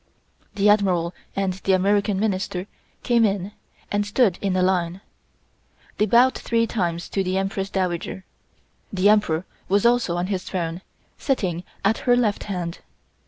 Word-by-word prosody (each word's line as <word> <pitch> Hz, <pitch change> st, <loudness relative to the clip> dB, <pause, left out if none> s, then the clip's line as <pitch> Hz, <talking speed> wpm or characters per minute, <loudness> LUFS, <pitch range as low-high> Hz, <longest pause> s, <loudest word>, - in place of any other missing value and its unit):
The 200 Hz, 0 st, +2 dB
Admiral 185 Hz, -5 st, +3 dB, 0.2 s
and 195 Hz, -1 st, 0 dB
the 190 Hz, +1 st, 0 dB
American 200 Hz, +1 st, +2 dB
Minister 190 Hz, -3 st, -1 dB, 0.4 s
came 235 Hz, -1 st, +3 dB
in, 200 Hz, -2 st, 0 dB, 0.4 s
and 205 Hz, 0 st, +1 dB
stood 205 Hz, -2 st, +2 dB
in 195 Hz, -2 st, 0 dB
a 185 Hz, -, +2 dB
line. 180 Hz, 0 st, 0 dB, 1.0 s
They 210 Hz, -, +3 dB
bowed 245 Hz, +5 st, +5 dB
three 230 Hz, -1 st, 0 dB
times 175 Hz, -7 st, -2 dB
to 195 Hz, -, 0 dB
the 185 Hz, 0 st, -1 dB
Empress 195 Hz, 0 st, -2 dB
Dowager. 185 Hz, 0 st, -2 dB, 0.7 s
The 195 Hz, +1 st, +3 dB
Emperor 190 Hz, -5 st, +2 dB, 0.2 s
was 200 Hz, +3 st, +2 dB
also 235 Hz, -7 st, +3 dB
on 175 Hz, -, 0 dB
his 190 Hz, -1 st, -2 dB
throne, 170 Hz, -1 st, -3 dB, 0.4 s
sitting 185 Hz, -, -1 dB, 0.2 s
at 220 Hz, +3 st, +2 dB
her 245 Hz, -, +7 dB
left 215 Hz, -4 st, 0 dB
hand. 180 Hz, -4 st, -4 dB
195 Hz, 150 wpm, -23 LUFS, 180-210 Hz, 1.0 s, her